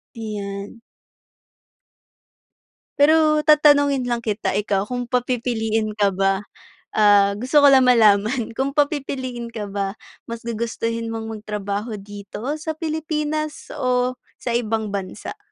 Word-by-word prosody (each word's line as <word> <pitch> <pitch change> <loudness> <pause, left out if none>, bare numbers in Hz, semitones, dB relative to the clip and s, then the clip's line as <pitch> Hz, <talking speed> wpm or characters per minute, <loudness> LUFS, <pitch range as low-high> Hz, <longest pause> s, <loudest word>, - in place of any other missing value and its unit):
Iyan. 205 -1 -6 2.2
Pero 305 +1 +4
tatanungin 285 -4 +4
lang 235 -1 -2
kita, 210 -2 -1
ikaw 205 -1 0
kung 245 0 -3
papipiliin 230 -3 -1
ka 205 -1 +2
ba, 195 0 +1 0.6
ah, 205 -1 +5
gusto 260 +6 +3
ko 285 - +8
lang 265 -2 +6
malaman, 220 0 +4
kung 275 +1 -1
papipiliin 260 -5 -2
ka 210 -3 -5
ba, 195 -1 -2 0.3
mas 230 0 -7
gugustuhin 230 0 -3
mong 225 0 -5
magtrabaho 210 0 -4
dito 205 +7 -6
sa 315 +1 -4
Pilipinas 310 -1 -3
o 250 0 0 0.2
sa 240 - -2
ibang 220 -2 -2
bansa? 200 - -6
235 Hz, 115 wpm, -22 LUFS, 210-275 Hz, 2.2 s, ko